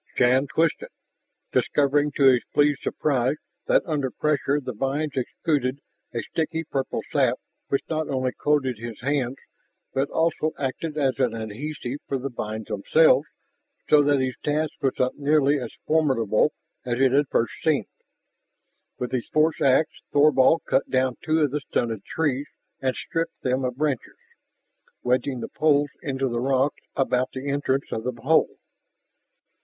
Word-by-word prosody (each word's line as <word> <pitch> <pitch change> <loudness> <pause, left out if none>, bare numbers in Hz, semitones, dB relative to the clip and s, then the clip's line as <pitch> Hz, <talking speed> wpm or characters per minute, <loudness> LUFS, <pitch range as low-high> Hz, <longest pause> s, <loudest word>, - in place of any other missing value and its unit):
Shann 130 +3 +3
twisted, 165 - 0 0.6
discovering 145 +1 +2
to 140 - 0
his 130 -3 +6
pleased 145 -1 +3
surprise 135 -2 0 0.3
that - - +3
under 150 -6 -1
pressure 145 +1 0
the 130 -3 -5
vines 140 +6 -1
exuded 135 0 -1 0.3
a 115 -2 -3
sticky 160 +4 -2
purple 135 -3 -2
sap 130 -4 +2 0.3
which 140 - 0
not 155 -1 -2
only 130 -2 0
coated 135 -6 0
his 115 -1 -7
hands, 135 -1 0 0.6
but 135 +1 0
also 160 -1 0
acted 150 +3 -3
as 135 -4 +1
an 125 -4 +1
adhesive 125 +5 -5
for 135 - -1
the 135 +1 -4
vines 110 -2 -5
themselves 140 +8 +3 0.6
so 150 - +8
that 145 -1 +3
his 130 -1 0
task 150 +1 0
was 135 -2 +1
not 130 +2 0
nearly 145 0 +3
as 120 -3 -5 0.2
formidable 135 -6 +2 0.3
as 120 -1 -2
it 135 -1 +4
had 140 +1 +3
first 115 - +1
seemed. 155 -4 +2 1.1
With 125 - -4
his 125 -3 -2
force 155 +1 +2
ax 135 +3 +4 0.2
Thorvald 145 +1 +4
cut - - +1
down 130 -1 +1
two 160 0 +2
of 145 -3 +2
the 150 - -1
stunted 115 -6 -2
trees 145 -3 -1 0.3
and 130 -1 0
stripped 165 0 -4
them 130 0 0
of 125 -1 -2
branches, 145 -4 -2 0.9
wedging 125 +1 0
the - - -4
poles 145 -2 +2
into 135 -4 -1
the 120 -1 -2
rocks 135 +2 +1
about 130 -1 0
the 130 +2 -5
entrance 140 -1 -1
of 110 - -3
the 125 -2 -3
hole. 155 +6 +2
135 Hz, 155 wpm, -25 LUFS, 125-150 Hz, 1.1 s, so